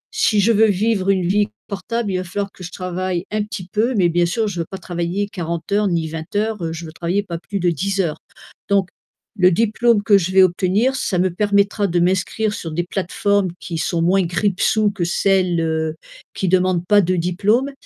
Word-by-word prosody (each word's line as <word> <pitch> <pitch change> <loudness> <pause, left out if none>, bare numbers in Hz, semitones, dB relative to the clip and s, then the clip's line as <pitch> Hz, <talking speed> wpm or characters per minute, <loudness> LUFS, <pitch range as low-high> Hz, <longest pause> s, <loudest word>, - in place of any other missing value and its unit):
si 220 - +2
je 225 +4 +4
veux 220 0 +5
vivre 200 0 +1
une 185 -3 +2
vie 205 +2 +2 0.2
portable, 205 +2 -3
il 185 - 0
va 185 - -2
falloir 200 +3 -4
que 180 - -13
je 175 - -7
travaille 180 0 -3
un 215 0 0
petit 195 -4 -7
peu, 230 +4 +1
mais 180 -4 +3
bien 175 +1 +2
sûr 215 +5 -1
je 180 -4 -4
veux 165 - -1
pas 190 - -6
travailler 175 +2 -3
40 170 -4 -5
heures, 205 0 +2
ni 165 -3 0
20 160 +4 -7
heures. 205 -6 -1
Je 165 +1 -6
veux 155 - -9
travailler 175 +5 -1
pas 170 -4 -6
plus 200 +3 -5
de 175 0 +2
10 195 +5 -2
heures 165 -5 0 0.5
donc 195 -2 +2 0.5
le 180 -1 +5
diplôme 225 +2 +2
que 200 0 +5
je 185 0 -1
vais 190 0 +6
obtenir 195 +8 +1
ça 195 -7 -1
me 185 +1 +2
permettra 200 +1 +1
de 175 0 0
m'inscrire 190 +4 0
sur 165 -6 -6
des 175 +2 -1
plateformes 195 +1 0
qui 165 -2 -5
sont 165 +2 -1
moins 185 +3 +3
grippe-sous 200 +4 +1
que 195 -3 -3
celles, 185 -1 +1
heu, 160 -1 -1 0.4
qui 190 - -1
demandent 180 -1 +2
pas 205 -1 +5
de 185 +1 0
diplôme 205 +10 +1
185 Hz, 210 wpm, -20 LUFS, 175-205 Hz, 0.5 s, vais